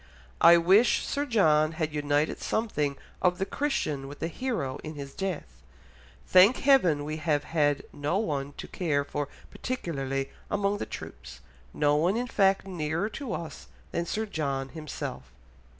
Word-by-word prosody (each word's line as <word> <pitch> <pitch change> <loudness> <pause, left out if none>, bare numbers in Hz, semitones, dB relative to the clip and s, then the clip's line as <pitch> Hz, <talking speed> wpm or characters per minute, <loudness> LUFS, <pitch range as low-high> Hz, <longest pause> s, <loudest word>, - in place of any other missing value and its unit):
I 170 +1 +9
wish 190 +8 +4
Sir 285 +1 -2
John 155 - +3
had 160 -2 -2
united 145 0 0
something 150 -11 -1 0.2
of 180 -1 +3
the 195 - -1
Christian 155 - -2
with 145 +1 -9
the 165 - -3
hero 175 - -3
in 155 0 -6
his 140 -1 -7
death. 150 - -5 0.6
Thank 195 +7 +6
heaven 180 - +4
we 155 +1 -3
have 150 -2 0
had 145 -3 +1
no 145 +5 -1
one 145 -8 -2
to - - -8
care 150 -6 0
for 145 0 -3 0.2
particularly 135 - -3 0.2
among 205 0 0
the - - -4
troops, - - -9 0.3
no 145 - +2
one 175 +8 +2
in 245 - -1
fact 195 -5 +2
nearer 170 +1 -2
to 245 +2 -5
us 165 -3 -6 0.2
than 170 0 -2
Sir 220 +4 -1
John 140 -8 -2
himself." 130 - -6
160 Hz, 155 wpm, -28 LUFS, 145-195 Hz, 0.6 s, I